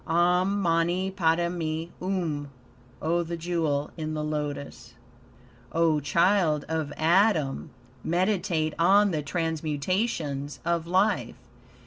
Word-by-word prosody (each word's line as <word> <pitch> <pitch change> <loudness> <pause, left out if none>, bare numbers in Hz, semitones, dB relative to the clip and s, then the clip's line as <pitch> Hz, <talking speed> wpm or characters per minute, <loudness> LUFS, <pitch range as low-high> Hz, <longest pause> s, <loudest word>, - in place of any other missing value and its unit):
"Om 180 +4 +2
Mani 175 +1 +1
Padme 165 -2 0 0.2
Um." 170 -6 -2 0.5
(Oh 170 +2 +1
the 170 0 -4
jewel 160 -4 -1
in 155 -1 -4
the 150 - -2
lotus.) 150 -4 -5 0.8
O 165 -2 +3
child 170 0 +2
of 160 -2 -2
Adam! 165 -4 +2 0.3
Meditate 175 -3 0
on 200 +4 +5
the 155 -3 -1
transmutations 155 -1 -2
of 170 -1 0
life. 190 +5 +1
165 Hz, 100 wpm, -27 LUFS, 155-180 Hz, 0.8 s, on